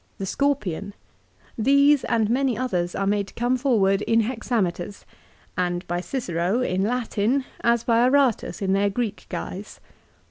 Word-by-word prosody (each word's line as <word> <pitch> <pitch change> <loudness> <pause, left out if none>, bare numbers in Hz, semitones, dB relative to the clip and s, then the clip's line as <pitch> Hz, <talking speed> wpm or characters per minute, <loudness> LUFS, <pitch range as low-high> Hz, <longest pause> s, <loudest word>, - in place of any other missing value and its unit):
"The 195 - -4
Scorpion;" 205 - -1 0.6
these 280 +4 +4
and 225 -2 +1
many 250 0 +1
others 180 -9 -1
are 195 - -1
made 200 0 0
to - - -14
come 245 +2 +1
forward 215 -7 +2
in 230 +1 +2
hexameters, 215 -5 -2 0.5
and 175 0 -1
by 175 +1 -2
Cicero 185 -2 -1
in 185 -6 0
Latin 240 +3 0 0.2
as 235 0 +3
by 230 -1 +3
Aratus 255 -4 +2
in 190 0 +1
their 200 +1 +2
Greek 215 0 -3
guise. 200 +3 -6
220 Hz, 145 wpm, -24 LUFS, 195-250 Hz, 0.6 s, these